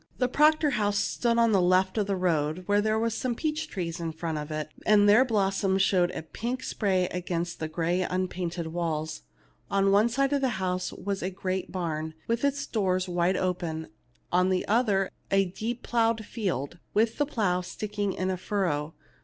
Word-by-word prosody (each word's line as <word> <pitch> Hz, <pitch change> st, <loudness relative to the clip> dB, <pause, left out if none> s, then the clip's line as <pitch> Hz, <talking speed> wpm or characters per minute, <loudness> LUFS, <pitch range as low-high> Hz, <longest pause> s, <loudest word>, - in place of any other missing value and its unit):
The 250 Hz, -, +2 dB
Proctor 300 Hz, +3 st, +4 dB
house 205 Hz, -4 st, +1 dB
stood 235 Hz, +3 st, +1 dB
at 230 Hz, -1 st, +4 dB
the 195 Hz, -3 st, +4 dB
left 185 Hz, +1 st, +3 dB
of 210 Hz, -3 st, 0 dB
the 200 Hz, -, 0 dB
road; 170 Hz, -1 st, 0 dB
there 205 Hz, +2 st, +2 dB
were 230 Hz, +1 st, +1 dB
some 240 Hz, +2 st, -2 dB
peach 310 Hz, +3 st, -2 dB
trees 175 Hz, -, -4 dB
in 165 Hz, -1 st, -3 dB
front 160 Hz, -1 st, -3 dB
of 150 Hz, +1 st, -6 dB
it, 155 Hz, 0 st, -3 dB
and 205 Hz, -1 st, +5 dB
their 215 Hz, +5 st, +7 dB
blossoms 195 Hz, -4 st, +1 dB
showed 180 Hz, -3 st, +3 dB
in -, -, -6 dB
a -, -, -5 dB
pink 240 Hz, +10 st, -4 dB
spray 190 Hz, -7 st, +1 dB
against 175 Hz, -1 st, -3 dB
the 155 Hz, -, -2 dB
gray 170 Hz, +3 st, 0 dB
unpainted 180 Hz, -2 st, -2 dB
walls. 160 Hz, -, -3 dB, 0.5 s
On 195 Hz, 0 st, +3 dB
one 210 Hz, +4 st, +4 dB
side 275 Hz, +3 st, +1 dB
of 280 Hz, -, +1 dB
the 255 Hz, -6 st, 0 dB
house 185 Hz, -1 st, -1 dB
was 200 Hz, -1 st, -4 dB
the 185 Hz, -, -2 dB
great 185 Hz, 0 st, -3 dB
barn, 160 Hz, -3 st, -3 dB
with 230 Hz, +2 st, 0 dB
its 280 Hz, 0 st, +1 dB
doors 185 Hz, -5 st, 0 dB
wide 175 Hz, +1 st, +1 dB
open; 170 Hz, -3 st, -2 dB, 0.4 s
on 180 Hz, +1 st, +3 dB
the 185 Hz, -1 st, 0 dB
other, 205 Hz, -4 st, +2 dB, 0.2 s
a 195 Hz, 0 st, +3 dB
deep 225 Hz, +7 st, -4 dB
ploughed 225 Hz, -2 st, +1 dB
field, 175 Hz, -, -3 dB, 0.2 s
with 220 Hz, +4 st, +2 dB
the 290 Hz, -, +3 dB
plough 190 Hz, -10 st, 0 dB
sticking 205 Hz, +1 st, -3 dB
in 185 Hz, 0 st, -1 dB
a 185 Hz, -, -2 dB
furrow. 170 Hz, -6 st, -1 dB
190 Hz, 190 wpm, -28 LUFS, 175-220 Hz, 0.5 s, their